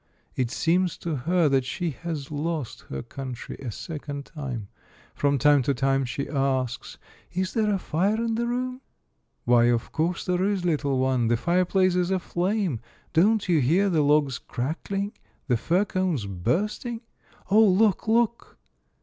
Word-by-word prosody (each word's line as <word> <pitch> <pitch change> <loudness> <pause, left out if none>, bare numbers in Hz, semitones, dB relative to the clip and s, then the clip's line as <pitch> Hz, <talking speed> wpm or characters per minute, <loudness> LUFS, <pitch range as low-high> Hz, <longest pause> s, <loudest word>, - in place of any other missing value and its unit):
It 125 -2 0
seems 180 +6 +1
to 165 -3 -3
her 165 +5 +2
that 135 -2 +2
she 175 +5 -3
has 150 -2 -6
lost 150 -3 -3
her 65 0 -4
country 130 -3 -7
a 130 - -5
second 145 - -6
time. 130 -9 -6 0.5
From 145 0 +1
time 145 +2 +5
to 135 +2 0
time 135 +1 +1
she 135 +3 -4
asks, 130 -3 -1 0.2
" - - -29
Is 185 +1 -1
there 215 -2 +2
a 200 - +2
fire 190 +4 0
in 230 0 -1
the 235 +1 -1
room?" 255 +1 -2 0.6
"Why, 120 -1 +5
of 120 -1 +1
course 170 +2 -1
there 180 0 +1
is, 195 -2 0
little 145 -5 +1
one. 130 -2 +2
The 120 +1 +2
fireplace 185 - +2
is 180 0 +1
aflame! 185 - 0 0.3
Don't 200 +6 +3
you 170 -3 +3
hear 180 +10 +3
the 160 -3 +3
logs 145 -3 +2
crackling, 195 +10 -3 0.4
the 125 - +3
fir 175 - +1
cones 185 - -1
bursting? 195 - -2 0.2
— - - -27
Oh, 215 +2 +7
look, 205 +1 +3
look 235 +1 +1
165 Hz, 165 wpm, -26 LUFS, 135-190 Hz, 0.6 s, Oh